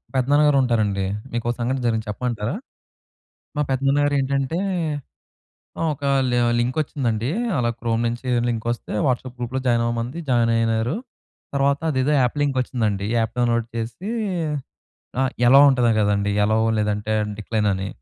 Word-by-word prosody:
పెద్దనాన్న 140 +4 +3
గారు 145 -2 +4
ఉంటారండి 105 -5 +1 0.3
మీకొ 120 0 -2
సంఘటన 125 +2 -1
జరిగింది 110 -2 0
చెప్పమంటారా? 115 - -2 1.0
మా - - +2
పెద్దనాన్న 135 +2 +2
గారు 145 0 +1
ఏంటంటే 135 +4 -1 1.2
ఆ! - - +1
ఒక 145 - -12 0.3
లి 125 - +1 0.2
లింకొచ్చిందండి 125 -3 -1 0.3
అలా 120 -2 +1
క్రోమ్ 115 -1 0
నుంచి 120 +2 -4 0.2
లింకొస్తే 120 0 -2
వాట్సాప్ 125 0 -2
గ్రూప్లో 125 +2 -3
జాయినవ్వమంది, 120 +2 0
జాయినైనారు. 115 +1 +2 0.6
తర్వాత 140 0 +2
అదేదో 130 +1 +1
యాప్ 125 +2 +1
లింకొచ్చిందండి. 125 -7 0
ఈ - - 0
యాప్ 110 - -2
డౌన్‌లోడ్ 120 -1 +1
చేసి 115 - -4 1.1
అ - - +4 0.2
ఎ‌లవ్ 135 +3 +8
ఉంటది 125 -3 +3
కదండీ, 100 -1 +1
ఎ‌లవ్ 110 +1 +2
లేదంటే 105 0 -1 0.3
డిక్లైన్ 105 0 -1
అని, 95 +1 -3
120 Hz, 130 wpm, -22 LUFS, 110-130 Hz, 1.2 s, ఎ‌లవ్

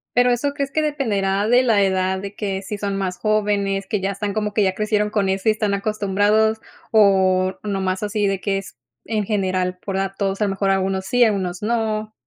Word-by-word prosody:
Pero, 245 0 +4
¿eso 280 +4 0
crees 280 -1 -2
que 310 +1 0
dependerá 205 -9 0
de 245 +2 +4
la 225 -5 +3
edad 190 0 0
,de 200 +1 -7
que, 195 -2 -3
si 205 +2 -5
son 200 -1 -2
más 185 -2 -2
jóvenes, 205 -2 0
que 210 - -1
ya 195 +1 -1
están 200 0 -3
como 210 -1 -1
que 210 - +2
ya 190 -1 +1
crecieron 210 0 0
con 205 -2 0
eso 190 +3 +1
y - - +6
están 210 -2 -1
acostumbrados 210 +2 +1 0.3
o 190 -3 +3
nada 200 -2 -2
más 185 +1 -2
así 205 0 0
de 195 -1 -1
que 195 0 -1
es 195 - -12 0.3
en 215 -2 -1
general 185 -3 -1
por 195 0 -5
datos, 195 0 -2
a 215 - +1
lo 200 - -1
mejor 195 0 -1
algunos 190 0 0
sí, 245 -1 +4
algunos 190 -4 0
no? 220 -1 -1
200 Hz, 215 wpm, -21 LUFS, 195-215 Hz, 0.3 s, y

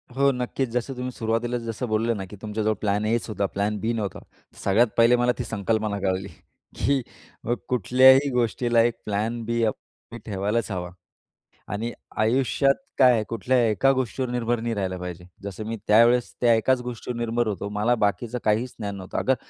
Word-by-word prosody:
हो 140 +1 +4
नक्कीच 125 0 -2
जसं 125 +3 -2
तुम्ही 125 0 -4
सुरुवातीलाच 120 +1 -1
जसं 115 +2 -4
बोलले 110 +1 +1
ना 100 -3 -5
की 105 - -9
तुमच्याजवळ 110 0 -1
प्लॅन 105 0 0
एच 115 +2 0
होता 105 -2 -1
प्लॅन 100 +2 -1
बी 110 +3 -1
नव्हता. 105 -4 -3 0.4
सगळ्यात 110 +5 +4
पहिले 115 +1 +6
मला 120 0 +2
ती - - -1
संकल्पना 110 -1 -1
कळली 95 0 -1 0.5
की 140 -1 +2 0.4
मग 120 - 0
कुठल्याही 130 +4 +5
गोष्टीला 120 -1 +2
एक 120 +1 +2
प्लॅन 110 +3 -2
बी 115 +1 0
आप 110 - +1
तुम्ही 120 - -15
ठेवायलाच 105 +3 -1
हवा. 90 -2 -3 0.8
आणि 115 +3 -3 0.3
आयुष्यात 130 +4 +2 0.2
काय, 125 -4 +5
कुठल्याही 115 +2 +2
एका 120 +7 +3
गोष्टीवर 130 0 -2
निर्भर 120 -1 0
नाही 115 0 -2
राहिला 95 -2 -2
पाहिजे. 90 -1 -7 0.2
जसं 100 +2 -6
मी 115 +1 -4
त्यावेळेस 115 +3 +4
त्या 120 -1 +5
एकाच 125 +3 +2
गोष्टीवर 125 0 -5
निर्भर 120 0 0
होतो 100 -1 -3
मला 105 +4 +1
बाकीचं 115 +4 -2
काहीच 110 +4 +1
ज्ञान 100 -2 -4
नव्हतं. 95 -1 -6
अगर 130 - +2
115 Hz, 175 wpm, -25 LUFS, 105-125 Hz, 0.8 s, पहिले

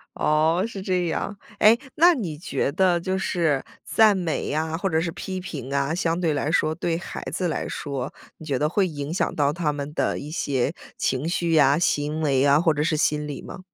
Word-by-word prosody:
哦， 160 +4 +2
是 200 -4 -7
这 180 -2 0
样。 200 +5 -3 0.2
诶， 215 +2 +7 0.2
那 345 +3 +6
你 180 - -4
觉 140 -4 -2
得 180 +1 +3
就 185 +2 -2
是 165 -7 0 0.2
赞 215 -2 +5
美 170 -4 -2
呀， 160 +2 -1
或 190 +3 -1
者 160 -2 +2
是 165 0 -2
批 185 +2 -5
评 140 -7 -6
啊， 140 +3 0
相 170 -1 0
对 165 -4 +1
来 145 +1 -1
说， 155 -1 +2
对 165 0 -1
孩 175 - -7
子 180 - -1
来 160 - -2
说， 135 -3 -4 0.2
你 160 - -11
觉 140 -4 0
得 150 - +1
会 190 +3 +1
影 145 -1 -5
响 180 - 0
到 145 -1 +2
他 160 -2 0
们 145 0 -5
的 - - 0
一 145 - -7
些 140 -2 -1 0.2
情 130 +4 -1
绪 170 0 0
呀、 145 -2 +5
行 150 -2 0
为 140 -2 +2
啊， 140 +2 +5
或 165 -2 +3
者 150 +1 0
是 155 -1 +1
心 150 -1 +1
理 145 -2 -6
吗？ - - -9
160 Hz, 230 characters per minute, -24 LUFS, 145-175 Hz, 0.2 s, 诶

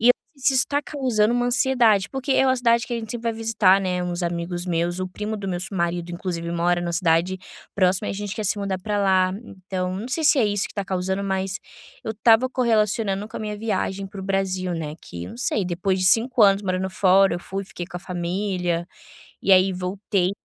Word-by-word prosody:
e 240 +3 +6 0.2
isso 275 0 +1
está 285 +3 +1
causando 240 -6 +1
uma 245 0 +1
ansiedade, 245 -6 +3
porque 270 0 -2
é 265 - +4
uma 260 0 +3
cidade 235 -1 +2
que 245 - -6
a - - -1
gente 220 -1 -7
sempre 235 -1 -5
vai - - -4
visitar, 220 -4 +3
né, 180 -1 -1
uns 175 0 -3
amigos 175 +1 -3
meus, 175 +1 -1
o 185 - -2
primo 210 +4 -4
do 200 -1 -6
meu 175 -1 -2
su 190 +2 -6
marido, 170 0 -1
inclusive, 170 -1 -4
ele 170 - -3
mora 175 +1 +2
na 170 -1 -3
cidade 170 +2 +1 0.4
próxima. 190 +1 +2
E - - -1
a - - -4
gente 205 0 -4
quer 215 - -4
se 205 +2 0
mudar 195 -2 -2
para 205 +2 -2
lá, 185 -2 +3 0.3
então 185 -1 -2
não 215 +6 -5
sei 315 +4 -1
se 295 -2 +5
é 230 - +4
isso 205 -1 0
que - - -7
está 200 -2 -3
causando, 190 +1 -2
mas 190 0 -2 0.5
eu 220 - -2
estava 225 +3 +4
correlacionando 215 -4 +1
com - - -8
a - - -5
minha 210 -1 -4
viagem 195 -2 -2
para 190 0 -9
o - - -6
Brasil, 190 -2 -1
né, 155 -2 -4
que 85 0 -8
não - - -10
sei, 215 -5 0
depois 185 +2 -1
de 185 - 0
5 230 +4 +3
anos 195 -1 +6
morando 185 0 -1
fora 190 -1 +4
eu - - -3
fui, 195 +2 -5
fiquei 175 -2 -7
com 180 - -8
a - - -18
família, 180 -1 -2 0.6
e 195 - +4
aí 185 +1 +6
voltei 185 0 -1
195 Hz, 230 wpm, -23 LUFS, 180-220 Hz, 0.6 s, e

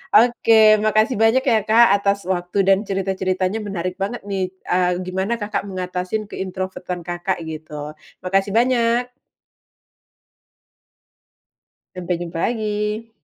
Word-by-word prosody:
Oke, 220 -2 +6
makasih 215 +3 +2
banyak 225 +4 +4
ya, 235 -5 +3
Kak, 230 +2 +6
atas 200 0 0
waktu 180 +1 -2
dan 195 +2 +3
cerita-ceritanya. 190 0 -1
Menarik 185 -1 -4
banget 200 +5 -3
nih, 190 -2 -2 0.2
eee, 180 0 +2
gimana 190 +5 -2
Kakak 205 -1 -2
mengatasin 185 +2 -4
ke-introvert-an 185 -2 -5
Kakak 175 +1 -3
gitu. 155 -1 -7 0.2
Makasih 195 +2 0
banyak. 240 +1 +2 2.9
Sampai 180 -1 -2
jumpa 170 -1 -5
lagi! 215 0 -2
195 Hz, 110 wpm, -21 LUFS, 180-220 Hz, 2.9 s, Oke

